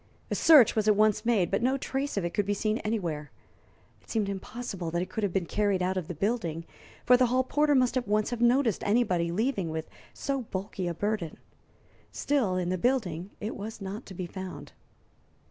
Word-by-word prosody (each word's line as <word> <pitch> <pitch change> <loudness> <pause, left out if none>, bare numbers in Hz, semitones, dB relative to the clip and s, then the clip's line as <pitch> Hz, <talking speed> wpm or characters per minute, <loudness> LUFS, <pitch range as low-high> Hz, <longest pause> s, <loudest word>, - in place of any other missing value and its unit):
A - - +2
search 295 -9 +7
was 215 -1 +1
at 210 - +5
once 215 +1 +2
made, 200 -8 +2
but 195 - +1
no 260 +3 +2
trace 270 -1 -3
of 190 - 0
it 170 - -2
could 205 -1 0
be 205 - +1
seen 215 +2 0
anywhere. 170 -9 -3 0.7
It - - -25
seemed 215 -3 0
impossible 195 -2 -5
that 170 +2 -1
it 185 - -9
could 220 - -3
have 200 - +1
been 185 -1 0
carried 200 0 0
out 185 +1 0
of 180 -4 -3
the 175 - -5
building, 170 -4 -2 0.4
for 250 - +7
the 250 0 +4
hall 255 +2 +2
porter 295 +2 +2
must 255 -1 +3
at 250 -4 -1
once 210 +2 +1
have 240 -1 -3
noticed 240 -3 +3
anybody 195 -6 +1
leaving 205 -2 0
with 160 0 -4 0.2
so 275 -1 -2
bulky 190 -4 -4
a 170 - -2
burden. 205 -4 -2 0.7
Still, 260 -10 0
in 180 -1 -1
the 185 0 -1
building 190 -8 0
it 210 +2 -4
was 220 +2 -7
not 200 +4 -6
to 190 - -9
be 180 - -4
found. 185 +1 -8
205 Hz, 210 wpm, -28 LUFS, 185-240 Hz, 0.7 s, search